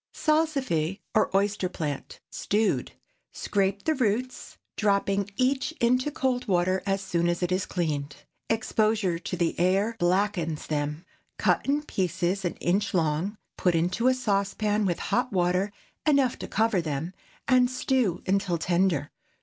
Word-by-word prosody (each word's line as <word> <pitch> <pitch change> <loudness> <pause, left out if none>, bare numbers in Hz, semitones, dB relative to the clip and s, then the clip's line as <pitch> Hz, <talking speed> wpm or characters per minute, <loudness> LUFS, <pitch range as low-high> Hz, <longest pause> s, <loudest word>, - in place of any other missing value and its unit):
SALSIFY 270 - 0
OR 215 - +3
OYSTER 200 -2 0
PLANT. 150 -6 -5
(Stewed.) 215 +2 0 0.5
✠ - - -14
Scrape 200 0 0
the 315 - +2
roots, 255 -1 -2 0.2
dropping 200 -1 +1
each 265 +4 +1
into 255 0 +2
cold 260 -4 -1
water 185 0 +2
as 195 0 +1
soon 170 -2 0
as 175 +1 -1
it 180 - 0
is 185 +1 0
cleaned. 150 -5 -2 0.3
Exposure 215 -5 +1
to 180 - -4
the 170 -1 +1
air 195 +6 +2
blackens 175 -3 0
them. 150 +2 -3 0.3
Cut - - +1
in 290 +2 +1
pieces 185 - -1
an 175 - -2
inch 200 +4 0
long, 165 +5 0 0.2
put 180 -2 +2
into 180 +9 +1
a 255 - +4
saucepan 210 -2 0
with 175 - 0 0.2
hot 250 +1 +1
water 180 +1 +1 0.4
enough 275 -4 +3
to - - -5
cover 220 -3 +1
them, 160 +2 -3 0.3
and 250 -1 +4
stew 255 -7 0
until 190 -2 +1
tender. 170 -3 +1
195 Hz, 145 wpm, -27 LUFS, 175-230 Hz, 0.5 s, a